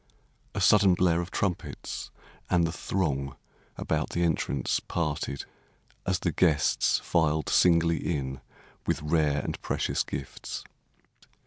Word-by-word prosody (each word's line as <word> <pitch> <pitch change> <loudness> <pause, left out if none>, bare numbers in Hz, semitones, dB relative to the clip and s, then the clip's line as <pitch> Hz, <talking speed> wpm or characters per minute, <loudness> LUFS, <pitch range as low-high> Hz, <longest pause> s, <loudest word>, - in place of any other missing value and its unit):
A - - -1
sudden 100 -3 +6
blare 85 -1 +3
of 85 - -6
trumpets, 95 -2 -3 0.4
and 85 -2 +3
the 80 - -1
throng 70 -8 -2 0.4
About - - -1
the 85 - -1
entrance 80 -4 0
parted 75 -4 -3 0.6
as 95 -1 +2
the 90 -1 -1
guests 80 -4 +3
Filed 80 -2 +1
singly 85 -1 +4
in 65 -5 -3 0.5
with - - +1
rare 75 -2 +2
and - - -5
precious - - -1
gifts. 70 - -5
85 Hz, 120 wpm, -28 LUFS, 75-90 Hz, 0.6 s, sudden